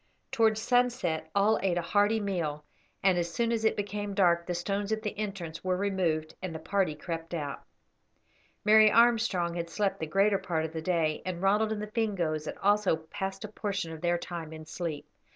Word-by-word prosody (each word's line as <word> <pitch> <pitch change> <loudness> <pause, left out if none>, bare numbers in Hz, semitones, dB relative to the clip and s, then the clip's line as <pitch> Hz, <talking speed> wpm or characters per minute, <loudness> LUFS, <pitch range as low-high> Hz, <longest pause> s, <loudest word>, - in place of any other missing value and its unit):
Towards 220 -1 +3
sunset 235 -10 +1
all 205 +2 +4
ate 185 -2 +1
a - - +1
hearty 205 +5 +2
meal, 165 -7 -2 0.4
and 185 -2 +4
as 170 0 -2
soon 230 +6 0
as 225 -1 0
it 220 - +3
became 205 0 -3
dark 170 -3 +3
the 175 - -1
stones 200 +4 -2
at 220 0 -1
the 210 - -3
entrance 195 -6 -5
were 185 -1 0
removed 180 -6 0
and 185 -3 -5
the - - -2
party 180 0 0
crept 165 +2 -5
out. 145 -4 -4 1.0
Mary 215 0 +7
Armstrong 225 -7 +3
had 170 -1 -4
slept 195 +4 -1
the 160 - -3
greater 195 +4 +3
part 170 -5 -1
of 160 - -6
the 160 - -3
day, 160 -3 0
and 185 -2 -4
Ronald 210 +3 +2
and 210 -1 -2
the - - -2
Fingoes 180 -9 -1
had - - -5
also 205 -3 +3
passed 190 +5 -5
a - - -4
portion 200 -5 -3
of 160 -1 -8
their 175 0 +2
time 170 -2 -6
in 155 0 -9
sleep. 160 -1 -5
185 Hz, 200 wpm, -29 LUFS, 165-210 Hz, 1.0 s, Mary